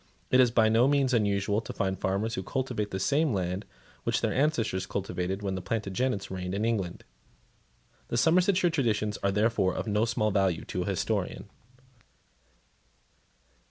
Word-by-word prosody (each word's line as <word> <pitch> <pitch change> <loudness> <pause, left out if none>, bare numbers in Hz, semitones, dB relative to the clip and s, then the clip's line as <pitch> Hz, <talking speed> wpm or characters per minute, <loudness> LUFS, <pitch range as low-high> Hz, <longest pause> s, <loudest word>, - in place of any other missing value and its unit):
It 130 - +5
is 125 -2 +6
by 115 -1 +4
no 115 +3 +4
means 140 -2 +2
unusual 100 -1 +1
to - - -7
find 95 0 -1
farmers 100 +4 -1
who 95 - -2
cultivate 120 -1 -2
the 95 - -4
same 140 +8 +2
land 95 +1 -2 0.4
which - - 0
their - - 0
ancestors 115 - 0
cultivated 95 0 -3
when 95 -1 -1
the 95 - -3
Plantagenets 105 +2 -2
reigned 90 0 -4
in 105 +2 0
England. 100 -7 -2 1.0
The 120 - -2
Somersetshire 180 - +3
traditions 110 -8 0
are 100 - +1
therefore, 105 -2 +1
of - - -3
no 105 0 +1
small 110 -2 0
value 95 -4 +1
to - - -3
a - - -2
historian. - - -2
105 Hz, 160 wpm, -28 LUFS, 95-120 Hz, 1.0 s, is